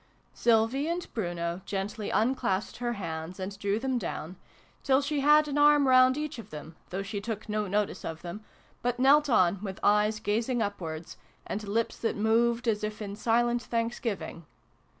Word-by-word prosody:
Sylvie 235 Hz, +5 st, +2 dB
and 345 Hz, +1 st, -2 dB
Bruno 175 Hz, -3 st, -3 dB
gently 200 Hz, +2 st, -4 dB
unclasped 220 Hz, -4 st, 0 dB
her 240 Hz, 0 st, -2 dB
hands 165 Hz, -2 st, -5 dB
and 190 Hz, +2 st, -4 dB
drew 200 Hz, 0 st, 0 dB
them 255 Hz, +1 st, -1 dB
down 180 Hz, -5 st, -5 dB, 0.5 s
till 265 Hz, -1 st, +3 dB
she 290 Hz, +1 st, -1 dB
had 300 Hz, +2 st, +5 dB
an 290 Hz, 0 st, -1 dB
arm 295 Hz, -1 st, +6 dB
round 255 Hz, +1 st, +6 dB
each 300 Hz, -4 st, -4 dB
of 230 Hz, -, -10 dB
them, 155 Hz, +1 st, -9 dB
though 190 Hz, +2 st, -3 dB
she 200 Hz, 0 st, -4 dB
took 220 Hz, 0 st, -5 dB
no 210 Hz, -1 st, -1 dB
notice 205 Hz, +2 st, -1 dB
of 160 Hz, 0 st, -6 dB
them, 180 Hz, +5 st, -7 dB, 0.4 s
but 245 Hz, 0 st, -1 dB
knelt 285 Hz, +3 st, +5 dB
on 185 Hz, -5 st, +3 dB
with 195 Hz, -3 st, -6 dB
eyes 210 Hz, +1 st, +3 dB
gazing 225 Hz, +4 st, 0 dB
upwards, 170 Hz, -7 st, -4 dB, 0.3 s
and 210 Hz, +1 st, -4 dB
lips 225 Hz, +3 st, -1 dB
that 230 Hz, -, -1 dB
moved 230 Hz, +3 st, +2 dB
as 215 Hz, -2 st, +1 dB
if 210 Hz, 0 st, -3 dB
in 200 Hz, -2 st, -5 dB
silent 240 Hz, +2 st, +1 dB
thanksgiving. 230 Hz, -, -3 dB
220 Hz, 170 wpm, -29 LUFS, 200-245 Hz, 0.5 s, arm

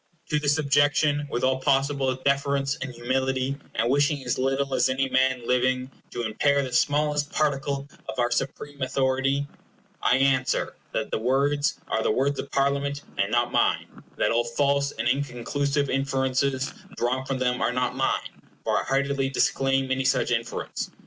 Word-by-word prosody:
To 150 Hz, -, +2 dB
this 145 Hz, 0 st, +2 dB
objection, 145 Hz, 0 st, +2 dB
with 120 Hz, -, -2 dB
all 130 Hz, 0 st, +2 dB
possible 135 Hz, 0 st, +1 dB
deference 140 Hz, +1 st, 0 dB
and 130 Hz, -5 st, -5 dB
humility, 130 Hz, +2 st, -1 dB, 0.2 s
and 115 Hz, -, +1 dB
wishing 145 Hz, +2 st, +2 dB
as 125 Hz, -, -1 dB
little 135 Hz, +1 st, 0 dB
as -, -, +3 dB
any 135 Hz, +1 st, +1 dB
man 130 Hz, -2 st, +1 dB
living 130 Hz, +1 st, +1 dB, 0.2 s
to 120 Hz, -, -4 dB
impair 140 Hz, +6 st, +2 dB
the 130 Hz, -2 st, -5 dB
smallest 145 Hz, +2 st, +1 dB
particle 140 Hz, -2 st, -1 dB, 0.2 s
of -, -, -5 dB
our 120 Hz, -1 st, +1 dB
supreme 140 Hz, +2 st, -3 dB
authority, 135 Hz, +1 st, +1 dB, 0.6 s
I 125 Hz, -, +4 dB
answer, 130 Hz, -2 st, +1 dB, 0.2 s
that -, -, -2 dB
the -, -, 0 dB
words 140 Hz, +5 st, +1 dB
are 110 Hz, -, 0 dB
the -, -, +1 dB
words 140 Hz, +2 st, +1 dB
of -, -, -5 dB
Parliament, 140 Hz, +1 st, 0 dB, 0.2 s
and 100 Hz, +1 st, +1 dB
not 120 Hz, 0 st, +2 dB
mine, -, -, +2 dB
and -, -, -16 dB
that -, -, +2 dB
all 115 Hz, +1 st, +2 dB
false 140 Hz, +4 st, +1 dB
and 120 Hz, -, -3 dB
inconclusive 140 Hz, +2 st, 0 dB
inferences 135 Hz, 0 st, 0 dB, 0.2 s
drawn 125 Hz, +2 st, 0 dB
from 135 Hz, 0 st, -2 dB
them 125 Hz, -1 st, 0 dB
are -, -, +2 dB
not 125 Hz, 0 st, -1 dB
mine, -, -, -2 dB, 0.2 s
for -, -, +1 dB
I -, -, -3 dB
heartily 135 Hz, 0 st, 0 dB
disclaim 135 Hz, 0 st, +1 dB
any 130 Hz, 0 st, +1 dB
such 130 Hz, -, +2 dB
inference. 115 Hz, -1 st, -2 dB
135 Hz, 170 wpm, -25 LUFS, 130-140 Hz, 0.6 s, I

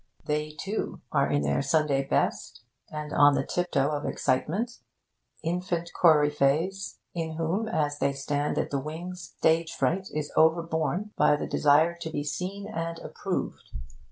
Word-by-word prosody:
They, 150 Hz, 0 st, -1 dB
too, 205 Hz, +3 st, -3 dB
are -, -, +2 dB
in 70 Hz, -, +1 dB
their 70 Hz, -, +1 dB
Sunday 140 Hz, -1 st, +2 dB
best, 135 Hz, -, -1 dB, 0.3 s
and 150 Hz, -1 st, -5 dB
on 145 Hz, 0 st, +6 dB
the 135 Hz, -, 0 dB
tiptoe 155 Hz, -5 st, 0 dB
of 145 Hz, -1 st, -2 dB
excitement 205 Hz, -, -1 dB, 0.6 s
infant 175 Hz, 0 st, -2 dB
coryphe'es, 155 Hz, +4 st, +3 dB, 0.2 s
in 165 Hz, -2 st, -3 dB
whom, 165 Hz, +7 st, -1 dB
as 145 Hz, -7 st, -1 dB
they 140 Hz, -, +2 dB
stand 145 Hz, +1 st, -1 dB
at -, -, -1 dB
the 140 Hz, -, 0 dB
wings, 170 Hz, +5 st, -7 dB
stage 160 Hz, 0 st, +2 dB
fright 180 Hz, +9 st, 0 dB
is 150 Hz, -1 st, -4 dB
overborne 165 Hz, +5 st, +2 dB
by -, -, +5 dB
the 145 Hz, -, -3 dB
desire 155 Hz, +4 st, +4 dB
to 170 Hz, -1 st, -5 dB
be 145 Hz, -2 st, -3 dB
seen 180 Hz, +7 st, -4 dB
and 165 Hz, 0 st, -4 dB
approved. -, -, -4 dB
160 Hz, 150 wpm, -27 LUFS, 145-175 Hz, 0.6 s, on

